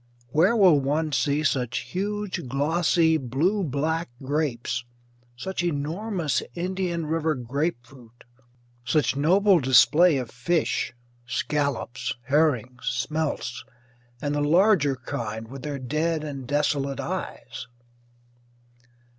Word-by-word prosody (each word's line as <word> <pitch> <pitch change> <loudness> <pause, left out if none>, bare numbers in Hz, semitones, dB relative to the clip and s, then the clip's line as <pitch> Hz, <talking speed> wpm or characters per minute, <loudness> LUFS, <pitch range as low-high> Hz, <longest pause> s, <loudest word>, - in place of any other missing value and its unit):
Where 170 - +3
will 185 -9 +6
one 150 +3 0
see 145 +2 +1
such 125 -3 0
huge 205 -4 -3
glossy 160 +4 +2
blue 155 - 0
black 160 +3 -1
grapes; 130 -4 -1 0.5
such 190 +8 -3
enormous 165 - -1
Indian 180 -2 -2
River 160 0 0
grapefruit; 125 -2 -5 0.6
such 140 0 +1
noble 185 +6 +4
display 150 +5 +5
of 125 -3 -4
fish 155 +6 0 0.4
scallops, 130 -2 -2
herrings, 130 -5 +1
smelts, 130 +1 -2 0.6
and 145 +2 -2
the 145 - 0
larger 160 -2 +4
kind 115 -3 -5
with 135 +3 -9
their 145 +1 -4
dead 155 +5 -1
and 140 -4 -6
desolate 145 -1 0
eyes? - - -5
145 Hz, 105 wpm, -25 LUFS, 130-165 Hz, 0.6 s, will